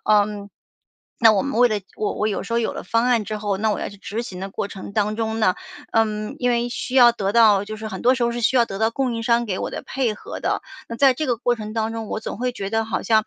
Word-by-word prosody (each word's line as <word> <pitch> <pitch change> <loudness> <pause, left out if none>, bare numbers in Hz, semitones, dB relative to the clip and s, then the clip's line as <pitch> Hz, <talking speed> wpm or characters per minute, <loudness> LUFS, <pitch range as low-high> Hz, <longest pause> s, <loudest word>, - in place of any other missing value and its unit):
嗯， 205 -1 +2 0.7
那 225 -2 +7
我 200 - +2
们 275 -4 -3
为 245 - +7
了 210 -2 -1 0.2
我 215 - -1
我 210 - 0
有 205 - -2
时 - - -7
候， 235 - +3
有 230 - -1
了 - - -6
方 230 +1 +1
案 240 -4 +2
之 215 +2 -4
后， 205 -2 -1
那 215 +2 +1
我 210 - -1
要 - - -3
去 200 - -12
执 220 +4 -4
行 185 -5 -8
的 195 - -5
过 200 - -3
程 200 0 -9
当 210 0 0
中 225 -1 -2
呢， 185 -4 +3 0.4
呃， 225 0 +4 0.4
因 245 - +2
为 240 0 +1
需 250 +1 -5
要 240 -2 +8
得 200 -4 -2
到 215 -4 +5
就 215 +1 -6
是 220 0 -7
很 - - -6
多 250 +2 +5
时 240 - -2
候 235 - 0
是 240 - -3
需 255 +3 +2
要 240 - +5
得 195 - -6
到 220 +1 +3
供 255 0 -1
应 230 - -3
商 235 0 +2
给 185 -3 -2
我 - - -3
的 - - -6
配 255 -5 -1
合 - - -8
的。 - - -1 0.3
那 230 - -5
在 270 -1 +5
这 310 +4 -2
个 240 - +2
过 245 +1 +1
程 215 -1 -6
当 225 0 -1
中， 225 -2 -5
我 - - -2
总 220 - -6
会 250 +1 0
觉 195 -4 -5
得 225 0 +1
好 220 - -2
像， 220 -2 +3
225 Hz, 320 characters per minute, -22 LUFS, 210-235 Hz, 0.7 s, 要